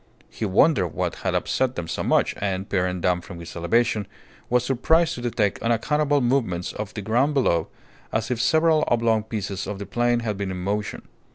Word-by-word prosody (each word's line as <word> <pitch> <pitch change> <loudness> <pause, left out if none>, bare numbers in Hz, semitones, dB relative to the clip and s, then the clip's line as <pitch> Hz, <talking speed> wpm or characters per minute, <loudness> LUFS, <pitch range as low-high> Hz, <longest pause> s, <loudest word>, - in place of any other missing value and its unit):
He 110 - -4
wondered 100 - +3
what - - -3
had - - -2
upset 130 -1 0
them 85 - -4
so - - -3
much, - - +2
and, 95 -1 -2
peering 90 -2 -1
down 90 0 +1
from 90 -1 -10
his 85 - -9
elevation, 105 +4 +1 0.4
was 125 0 +2
surprised 160 +6 +2
to 120 - -6
detect 110 -4 0
unaccountable 145 +5 +1
movements 120 -9 0
of 105 -1 -5
the 105 - -4
ground 130 +8 +1
below, 85 - +2 0.4
as 110 +2 -1
if 120 -2 0
several 160 +3 +3
oblong 115 -2 +2
pieces 105 -3 -4
of 105 - -4
the 100 - -6
plain 120 +4 +1
had 105 -3 -2
been 100 -1 -3
in 95 - -4
motion. 105 +2 -3
110 Hz, 190 wpm, -24 LUFS, 95-125 Hz, 0.4 s, wondered